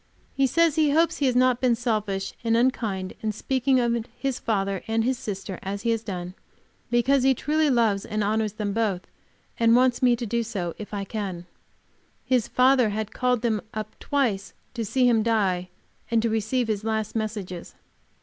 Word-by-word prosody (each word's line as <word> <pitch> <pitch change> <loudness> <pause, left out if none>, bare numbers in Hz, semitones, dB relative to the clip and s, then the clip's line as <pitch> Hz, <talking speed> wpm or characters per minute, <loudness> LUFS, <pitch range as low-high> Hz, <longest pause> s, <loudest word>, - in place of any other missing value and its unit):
He 275 -1 +2
says 335 +2 +2
he 310 -2 +4
hopes 330 +3 +2
he 280 - +1
has 250 - +1
not 255 -1 +3
been 250 -2 +3
selfish 215 -5 -2
and 230 -1 +2
unkind 220 -7 0
in 220 - -1
speaking 260 +4 +1
of 235 -1 0
his 270 -2 -2
father 195 -4 -1
and 225 +3 +1
sister 195 -6 -6
as 200 +2 -5
he 230 - +2
has 225 -1 0
done, 180 -5 -5 0.6
because 245 +3 +3
he 265 +1 +4
truly 305 +3 +1
loves 225 -6 +2
and 215 -1 -2
honors 215 0 0
them 210 -2 -3
both, 205 -5 -1 0.5
and 230 0 +5
wants 250 -1 +3
me 245 -2 +5
to 240 0 -5
do 235 +2 0
so, 195 -7 -3
if 210 - -8
I 200 -1 -3
can. 195 -4 -5 0.8
His 250 -3 +2
father 255 -2 +4
had 215 0 -4
called 250 -2 0
them 220 -3 +1
up 215 0 -5
twice 230 -9 -1 0.2
to 235 -2 -3
see 245 +4 +2
him 230 -2 +4
die 195 -5 +1 0.4
and 230 -1 +3
to 230 - +1
receive 225 +3 0
his 215 -2 -2
last 220 -1 -2
messages. 205 -5 -4
225 Hz, 185 wpm, -25 LUFS, 205-250 Hz, 0.8 s, and